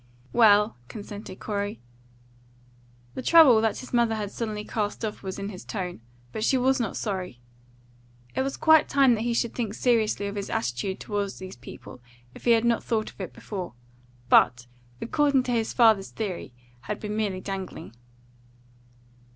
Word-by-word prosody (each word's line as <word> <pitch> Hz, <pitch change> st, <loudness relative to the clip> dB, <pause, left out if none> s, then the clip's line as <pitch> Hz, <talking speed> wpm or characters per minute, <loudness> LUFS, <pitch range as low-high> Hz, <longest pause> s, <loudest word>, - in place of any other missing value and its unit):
"Well," 210 Hz, -, +5 dB
consented 205 Hz, -, -9 dB
Corey. 205 Hz, -1 st, -3 dB, 1.3 s
The -, -, -5 dB
trouble 270 Hz, -7 st, +7 dB
that 225 Hz, -1 st, +1 dB
his 255 Hz, -, -9 dB
mother 235 Hz, -2 st, +3 dB
had 205 Hz, -2 st, -4 dB
suddenly 215 Hz, -2 st, -4 dB
cast 210 Hz, +1 st, -2 dB
off 210 Hz, -, -5 dB
was 190 Hz, -1 st, -5 dB
in 200 Hz, 0 st, -4 dB
his 185 Hz, -3 st, -9 dB
tone; 180 Hz, -, -5 dB, 0.3 s
but 215 Hz, -, -4 dB
she 265 Hz, -, +3 dB
was 265 Hz, +1 st, +2 dB
not 225 Hz, -5 st, -2 dB
sorry. 185 Hz, -, -4 dB, 1.0 s
It -, -, +1 dB
was 270 Hz, +1 st, -2 dB
quite 315 Hz, -1 st, +5 dB
time 275 Hz, -3 st, +5 dB
that 220 Hz, -, -1 dB
he 235 Hz, 0 st, 0 dB
should 235 Hz, 0 st, 0 dB
think 225 Hz, -4 st, -3 dB
seriously 220 Hz, -4 st, +1 dB
of 200 Hz, 0 st, -4 dB
his 200 Hz, -, -4 dB
attitude 125 Hz, +11 st, -2 dB
toward 205 Hz, -2 st, -3 dB
these 185 Hz, 0 st, -9 dB
people 125 Hz, +1 st, -12 dB, 0.3 s
if -, -, -13 dB
he 240 Hz, -, +5 dB
had 230 Hz, 0 st, +2 dB
not 235 Hz, -1 st, +2 dB
thought 220 Hz, -2 st, -1 dB
of -, -, -11 dB
it 185 Hz, -, -5 dB
before, 185 Hz, -, -7 dB, 0.5 s
but, 125 Hz, 0 st, +4 dB, 0.3 s
according 280 Hz, +1 st, +2 dB
to 250 Hz, -, -3 dB
his 225 Hz, -2 st, 0 dB
father's 220 Hz, -5 st, +4 dB
theory, 195 Hz, -, -5 dB, 0.3 s
had 205 Hz, +11 st, -5 dB
been 210 Hz, 0 st, -4 dB
merely 205 Hz, -4 st, -1 dB
dangling. 190 Hz, -, -6 dB
215 Hz, 165 wpm, -26 LUFS, 195-235 Hz, 1.3 s, trouble